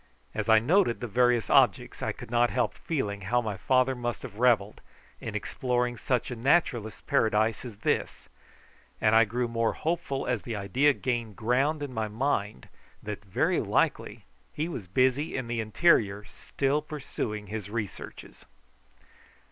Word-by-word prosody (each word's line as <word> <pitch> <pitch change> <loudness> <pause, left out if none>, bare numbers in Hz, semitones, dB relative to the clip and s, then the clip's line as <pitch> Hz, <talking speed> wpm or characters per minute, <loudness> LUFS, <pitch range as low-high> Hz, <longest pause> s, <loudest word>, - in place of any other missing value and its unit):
As 110 +1 -3
I 110 - +8
noted 150 - +3
the 125 - -4
various 120 0 +2
objects - - +3
I - - -1
could - - -11
not 120 0 +3
help 125 - 0
feeling 105 -11 -3
how 115 +6 +1
my 110 -4 -3
father 130 +5 +2
must 120 -2 -4
have 105 - -9
revelled 110 -5 +2 0.4
in - - -6
exploring 125 -1 -1
such 125 +1 -1
a - - -3
naturalist's 120 -4 +1
paradise 110 0 +1
as 115 -5 -9
this, - - -1 0.7
and 110 - +3
I 115 0 +7
grew 120 +3 -1
more 115 -1 0
hopeful 160 -4 -2
as 120 -5 -1
the 115 - -5
idea 125 +9 +2
gained 120 -5 -3
ground 135 +7 +1
in 140 -3 -5
my 110 -2 -1
mind 105 - -2 0.4
that 105 -1 -6
very 95 -2 +1
likely - - 0 0.3
he 155 +2 -2
was 115 - -6
busy 130 - +1
in 130 - -3
the 115 -1 -1
interior 105 -4 +2
still 140 +7 -2
pursuing 125 -8 -5
his 105 -1 -6
researches. 110 -2 -7
120 Hz, 155 wpm, -28 LUFS, 110-130 Hz, 0.7 s, I